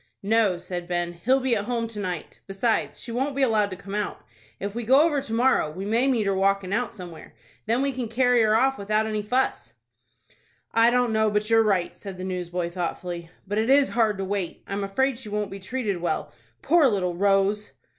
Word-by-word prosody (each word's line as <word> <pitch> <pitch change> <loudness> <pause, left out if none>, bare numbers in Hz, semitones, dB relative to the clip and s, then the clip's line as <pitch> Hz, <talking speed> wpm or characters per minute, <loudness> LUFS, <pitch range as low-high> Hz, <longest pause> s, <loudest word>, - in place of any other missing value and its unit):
"No," 210 -3 +2
said 175 0 -6
Ben; 175 -1 -1
"he'll 245 +11 +2
be 255 -2 +1
at 205 -1 -2
home 230 -1 -1
to 215 -2 -6
night. 180 -5 -5
Besides, 200 +4 -1
she 235 - -7
won't 265 +4 -1
be 275 - +1
allowed 215 -5 +2
to 185 - -6
come 195 +1 -10
out. 210 -1 -3 0.3
If 200 +1 -4
we 240 - -3
go 265 +5 +5
over 295 -4 +1
to 230 - -9
morrow, 245 -8 +3
we 185 +6 -6
may 230 +5 +2
meet 240 -6 +1
her 195 - +1
walkin' 195 0 +1
out 245 +3 0
somewhere. 175 -6 -11 0.3
Then 235 +4 +2
we 275 - +1
can 255 -2 -4
carry 245 +1 +3
her 215 -1 +3
off 265 +2 +2
without 215 +2 +1
any 215 -1 -2
fuss." 250 +6 -1 1.0
"I 230 +1 +5
don't 245 -1 +2
know 220 0 +3
but 210 +1 -1
you're 225 0 +6
right," 195 -5 +1
said 195 -2 -9
the 185 - -6
newsboy, 180 -2 -3
thoughtfully; 175 -1 -4 0.2
"but 205 +2 -1
it 225 +3 0
is 275 0 +5
hard 220 -4 +1
to 195 - -3
wait. 195 -2 -3
I'm 200 0 -3
afraid 245 +6 0
she 230 -5 -9
won't 210 -1 -2
be 195 - -7
treated 205 0 -2
well, 170 -3 -2 0.3
poor 320 -1 +5
little 190 -6 0
Rose!" 200 +3 +1
210 Hz, 215 wpm, -25 LUFS, 190-240 Hz, 1.0 s, you're